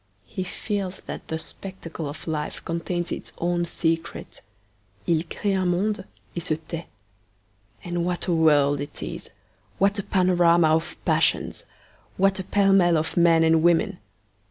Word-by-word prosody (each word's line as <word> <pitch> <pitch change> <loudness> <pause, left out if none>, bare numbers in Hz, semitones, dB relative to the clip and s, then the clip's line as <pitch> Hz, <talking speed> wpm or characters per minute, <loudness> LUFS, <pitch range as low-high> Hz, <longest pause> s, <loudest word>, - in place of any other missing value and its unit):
He 190 - -4
feels 195 0 -4
that - - -8
the 160 - -2
spectacle 165 -3 -7
of 150 +2 -9
life 150 -2 -3
contains 175 +1 -2
its - - -6
own 175 0 0
secret. 165 0 -3 0.7
'II 165 -2 +3
cree 200 +4 -2
un 185 -1 +1
monde 195 +2 0 0.3
et 170 - -2
se 155 - +1
tait.' 165 +1 -7 1.0
And 175 -1 -2
what 180 0 -1
a 180 - +1
world 145 -3 +4
it 145 0 -6
is! - - -6 0.5
What 200 +1 +2
a - - -2
panorama 175 -4 +4
of 160 +1 +1
passions! - - +1 0.5
What 195 +1 +3
a - - -2
pell 195 +1 +3
mell 175 -3 +5
of 155 +1 -2
men 170 -1 +5
and 160 0 +4
women! 170 -7 +2
175 Hz, 155 wpm, -25 LUFS, 160-185 Hz, 1.0 s, mell